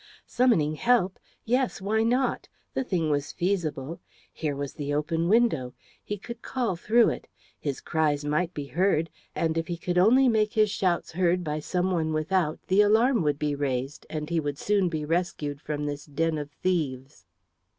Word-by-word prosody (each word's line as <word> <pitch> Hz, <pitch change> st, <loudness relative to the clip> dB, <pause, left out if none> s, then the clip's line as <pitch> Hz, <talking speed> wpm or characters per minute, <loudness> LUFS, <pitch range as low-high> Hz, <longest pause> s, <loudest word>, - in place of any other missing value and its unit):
Summoning 220 Hz, -12 st, +2 dB
help? 225 Hz, -5 st, +2 dB, 0.3 s
Yes! 250 Hz, +2 st, +1 dB
why 210 Hz, +3 st, +1 dB
not? 245 Hz, +4 st, +1 dB, 0.2 s
The -, -, 0 dB
thing 170 Hz, -9 st, 0 dB
was 145 Hz, 0 st, -1 dB
feasible. 170 Hz, -5 st, -2 dB, 0.3 s
Here 150 Hz, -3 st, -2 dB
was 140 Hz, -1 st, -4 dB
the 145 Hz, -1 st, -4 dB
open 165 Hz, +3 st, 0 dB
window. 205 Hz, -, +2 dB, 0.3 s
He 205 Hz, -, -4 dB
could 235 Hz, +4 st, -9 dB
call 245 Hz, -8 st, -1 dB
through 225 Hz, +7 st, +4 dB
it. -, -, -5 dB, 0.3 s
His 140 Hz, -3 st, -3 dB
cries 150 Hz, -3 st, 0 dB
might 155 Hz, +4 st, 0 dB
be 145 Hz, -5 st, -5 dB
heard, 165 Hz, 0 st, +1 dB, 0.2 s
and 165 Hz, 0 st, 0 dB
if 165 Hz, -, -4 dB
he 175 Hz, -, -3 dB
could 175 Hz, +1 st, 0 dB
only 250 Hz, +8 st, +6 dB
make 215 Hz, -2 st, +2 dB
his 215 Hz, -3 st, +3 dB
shouts 180 Hz, -4 st, 0 dB
heard 180 Hz, +1 st, +1 dB
by 150 Hz, -1 st, -2 dB
some 180 Hz, +4 st, -1 dB
one 160 Hz, -3 st, 0 dB
without 155 Hz, +1 st, 0 dB
the 190 Hz, +2 st, +4 dB
alarm 225 Hz, +3 st, +4 dB
would 150 Hz, -3 st, +1 dB
be 150 Hz, -1 st, -1 dB
raised, 135 Hz, 0 st, -3 dB
and 150 Hz, -1 st, -4 dB
he 170 Hz, 0 st, 0 dB
would 145 Hz, -2 st, -3 dB
soon 200 Hz, -1 st, +1 dB
be 155 Hz, -2 st, -3 dB
rescued 150 Hz, -3 st, -2 dB
from 150 Hz, -1 st, -3 dB
this 145 Hz, 0 st, -5 dB
den 160 Hz, +2 st, 0 dB
of 145 Hz, -1 st, -5 dB
thieves. 145 Hz, -, -3 dB
165 Hz, 180 wpm, -27 LUFS, 150-200 Hz, 0.3 s, only